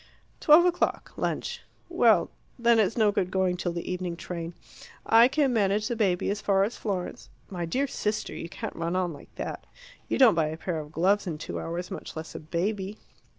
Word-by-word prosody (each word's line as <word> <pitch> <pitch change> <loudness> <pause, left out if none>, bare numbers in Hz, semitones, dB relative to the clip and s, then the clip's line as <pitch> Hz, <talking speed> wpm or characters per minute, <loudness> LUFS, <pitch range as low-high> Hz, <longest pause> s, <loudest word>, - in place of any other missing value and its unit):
Twelve 315 +3 +7
o'clock. 355 -1 0
Lunch. 480 0 -3 0.3
Well - - +3 0.3
then 235 -1 +4
it's 220 +2 +2
no 215 -2 +4
good 185 -3 0
going 185 -1 +1
till 175 -1 -2
the 170 0 -5
evening 180 -1 -3
train. 170 -1 -6 0.5
I 230 +2 +7
can 275 -1 +1
manage 210 -1 +2
the 240 - -1
baby 195 -5 +1
as 205 0 -3
far 195 -1 +3
as 220 +4 -2
Florence 190 -4 -4
" - - -33
"My 175 -2 -3
dear 265 +11 0
sister, 215 -5 -2
you 165 - -6
can't - - -6
run 165 +1 -2
on 180 -2 0
like 145 - -14
that. - - -6 0.4
You - - 0
don't 255 -5 +7
buy 165 -2 +1
a 155 +1 -5
pair 170 -1 -3
of 150 -1 -8
gloves 190 +5 +2
in 160 -3 -3
two 150 - -5
hours, 175 +2 -5
much - - -7
less 160 0 -7
a - - -6
baby." 190 +6 -2
190 Hz, 205 wpm, -27 LUFS, 170-220 Hz, 0.5 s, Twelve